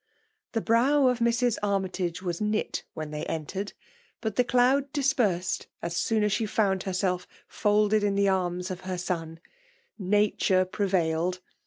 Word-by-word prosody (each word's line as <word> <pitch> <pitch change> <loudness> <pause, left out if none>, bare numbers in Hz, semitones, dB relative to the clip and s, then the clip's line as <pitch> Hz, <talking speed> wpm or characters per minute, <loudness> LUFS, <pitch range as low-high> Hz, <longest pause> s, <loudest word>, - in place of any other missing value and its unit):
The 225 - 0
brow 255 +5 +4
of 250 -1 0
Mrs. 235 0 +2
Armytage 185 -3 -1
was 175 0 -3
knit 210 0 -1
when 155 -2 -5
ilMy 150 0 -4
entered; 190 +6 -4 0.5
but 220 -3 -3
the 250 - +4
cloud 260 +3 +2
dispersed 220 -11 +1
as 170 0 -4
soon 215 +4 +1
as 210 - +2
she 215 +2 0
found 195 -3 +1
herself 180 -2 -1 0.2
folded 210 0 +2
in 200 -1 +1
the 200 0 +3
arms 180 -1 0
of 185 0 -6
her 185 0 -4
ipn: 170 -2 -3 0.6
nature 195 -1 +2
prevailed! 180 -3 0
195 Hz, 150 wpm, -27 LUFS, 180-220 Hz, 0.6 s, brow